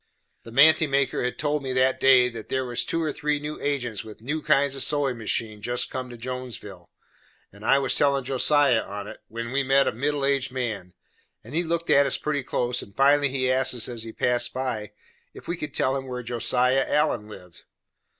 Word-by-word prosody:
The 115 - -12
manty 155 +4 +5
maker 140 -1 +1
had 125 - -2
told 150 0 -1
me 130 -1 -3
that 130 +1 +2
day, 130 -2 +6
that 115 -3 -8
there 130 0 -1
was 120 0 0
two 165 0 -1
or 150 -2 -2
three 150 -1 -1
new 150 +1 -6
agents 125 -6 -2
with 110 -1 -12
new 145 +7 -3
kinds 140 -2 +2
of 135 - -3
sewin' 145 -4 +2
machines 110 -1 -3
jest 120 +2 0
come 130 -1 -5
to 120 - -10
Jonesville, 115 -7 -8 0.6
and 100 +1 -15
I 135 +4 +4
was 135 -2 +1
tellin' 140 -2 +2
Josiah 135 -1 +3
on 100 0 -7
it, - - -9
when 115 +2 -6
we 140 +1 +1
met 135 0 +3
a - - +2
middle 140 +4 -1
aged 140 -2 0
man, 110 -8 -4 0.5
and 115 - -12
he 165 - +1
looked 170 0 -1
at 140 0 +5
us 135 - +1
pretty 150 -2 -2
close, 125 -1 -1
and 100 - -13
finally 140 +1 +4
he 130 -1 0
asked 130 0 +1
us 115 -2 -2
as 120 -2 -6
he 115 0 -6
passed 120 +1 0
by, 115 -5 -4 0.4
if - - -12
we 170 - -2
could 150 -4 -7
tell 130 - +1
him 135 -1 -4
where 125 -1 -5
Josiah 125 +3 +1
Allen 150 -8 +1
lived. 90 -4 -13
130 Hz, 215 wpm, -25 LUFS, 120-140 Hz, 0.6 s, day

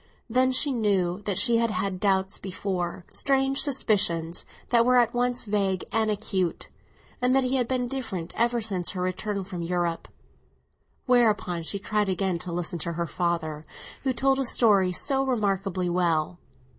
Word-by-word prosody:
Then 255 +2 +2
she 280 +3 +3
knew 200 -6 0
that 200 -3 0
she 230 +3 +5
had 230 0 +1
had 195 -3 -2
doubts 190 -1 +1
before—strange 195 +9 -1
suspicions, 175 - +1 0.2
that 235 -1 +4
were 250 +1 +4
at 240 0 +3
once 245 0 0
vague 195 -3 0
and 220 0 +1
acute—and 200 +5 -3
that 270 - +4
he 255 +1 0
had 245 -2 +1
been 250 -1 -1
different 230 -10 -5
ever 235 0 +1
since 195 -5 -1
her 185 - -4
return 195 +2 -3
from 180 -2 -7
Europe: 170 -1 -2 1.0
whereupon 215 -8 +2
she 165 +5 -2
tried 210 0 -1
again 190 -2 -1
to 175 - -4
listen 175 0 -3
to 170 +2 -2
her 170 +1 -2
father, 165 -3 -2 0.4
who 265 - 0
told 270 +2 +1
a 270 - 0
story 200 -7 +4
so 270 +8 0
remarkably 195 -7 -1
well. 175 -1 0
200 Hz, 155 wpm, -26 LUFS, 180-245 Hz, 1.0 s, she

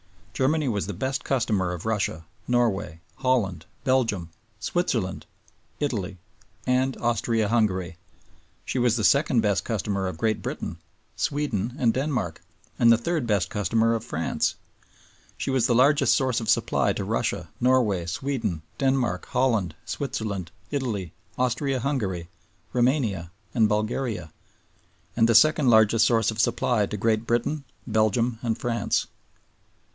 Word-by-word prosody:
Germany 150 +2 +1
was 105 -5 -1
the 105 - -4
best 130 +7 -2
customer 110 -9 0
of 90 +1 -6
Russia, 100 -7 -1 0.2
Norway, 110 -9 0 0.2
Holland, 100 -11 0 0.2
Belgium, 115 -10 +1 0.3
Switzerland, 115 - -1 0.5
Italy, 105 -10 -2 0.5
and 130 +1 +1
Austria 115 -1 0
Hungary; 95 -7 0 0.7
she 130 - -2
was 120 -2 +3
the 110 - -1
second 140 0 +4
best 105 -2 +1
customer 100 -3 -2
of 90 - -5
Great 110 +5 0
Britain, - - -5 0.4
Sweden, 125 -6 -1
and 115 -3 +2
Denmark; 130 - -2 0.4
and 115 -1 +6
the 115 - +6
third 155 +1 -1
best 100 -6 +1
customer 115 +2 +2
of 115 -1 -2
France. 85 -8 -1 0.8
She - - -2
was 130 -2 +2
the 120 - +2
largest 140 +1 +5
source 130 -4 +1
of 110 - -4
supply 120 - +2
to - - -3
Russia, - - -2
Norway, 115 -9 +2
Sweden, 105 - -2 0.2
Denmark, 130 -9 0
Holland, 115 -10 +1
Switzerland, 105 - -3 0.2
Italy, 115 - -2 0.2
Austria 130 +2 0
Hungary, 105 - -2 0.5
Roumania, 120 - +1 0.2
and 110 -3 +3
Bulgaria; 110 -4 -2 0.8
and 115 -1 +4
the 115 - +4
second 155 +1 +5
largest 110 -1 +5
source 115 -2 +2
of 110 - -7
supply 115 -2 +1
to 105 - -4
Great 110 +2 +1
Britain, 140 +5 0 0.2
Belgium, 110 +1 +1
and 115 -2 -1
France. 115 -1 0
115 Hz, 135 wpm, -25 LUFS, 100-130 Hz, 0.8 s, and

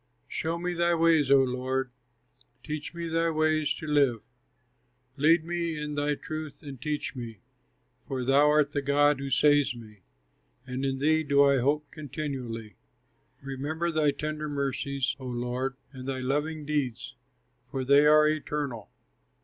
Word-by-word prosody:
Show 165 +1 -2
me 175 +1 -2
thy 170 0 +2
ways, 165 -4 +3
O 135 -1 +6
Lord, 130 0 -2 0.7
Teach 150 -1 -5
me 170 0 -4
thy 165 +1 +1
way 155 -1 +1
to 155 +2 -2
live. 140 -7 +2 0.9
Lead 160 +3 +4
me 170 -2 -2
in 150 0 -4
thy 145 0 0
truth 155 -1 -7
and 135 -4 -9
teach 150 -1 -3
me, 115 -4 -7 0.7
For 130 -2 -3
thou 140 +3 +5
art 150 -1 +3
the 145 - -1
God 145 +1 +3
who 140 0 -4
saves 145 -1 +3
me, 105 -4 -13 0.6
And 130 +1 -4
in 135 -1 0
thee 155 +3 +2
do 140 -2 +4
I 140 -1 +4
hope 145 +3 0
continually. 130 -7 -6 0.7
Remember 145 +5 -3
thy 155 -2 +2
tender 155 +1 -3
mercies, 140 -1 -1
O 130 - -7
Lord, 125 +2 -2 0.2
And 130 -2 -9
thy 130 -1 -2
loving 150 +4 -2
deeds, 130 -5 -2 0.5
for 130 -1 -3
they 140 +2 +6
are 150 0 +6
eternal. 145 -8 -3
145 Hz, 150 wpm, -28 LUFS, 130-155 Hz, 0.9 s, O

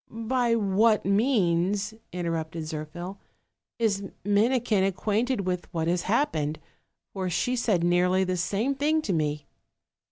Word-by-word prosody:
"By 230 +1 0
what 215 +1 +3
means," 200 -2 +1 0.2
interrupted 165 -2 -3
Zirphil, 160 +4 -6 0.6
"is 205 -4 0 0.2
Minikin 215 0 +2
acquainted 210 +5 0
with 180 -2 -3
what 165 -3 -1
has 175 +1 +1
happened? 160 - 0 0.6
for 190 -2 -2
she 180 +9 0
said 210 -8 +1
nearly 180 +2 +3
the 185 0 -1
same 205 +9 0
thing 305 +3 +1
to 195 - -1
me." 150 -2 -1
195 Hz, 125 wpm, -27 LUFS, 175-225 Hz, 0.6 s, what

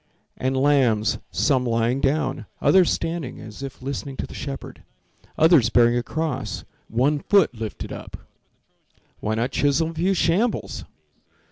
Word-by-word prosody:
And 130 +1 -1
lambs, 130 -6 +2
some 135 -4 +1
lying 120 +2 0
down, 135 -5 0
Others 185 -2 +5
standing, 165 -6 -3
as 110 +3 -10
if 135 -2 -8
listening 135 0 -5
to - - -3
the - - -11
shepherd— 140 -1 -7 0.6
Others 160 -8 +5
bearing 120 0 +4
a 120 - +1
cross, 145 -2 -3 0.2
one 135 +6 +1
foot 195 -3 +3
lifted 110 -3 -6
up— - - -8 1.0
Why 110 +1 -1
not 120 +4 -1
chisel 150 +3 +1
a - - -11
few 180 +4 +1
shambles? 190 +8 0
135 Hz, 140 wpm, -23 LUFS, 120-160 Hz, 1.0 s, Others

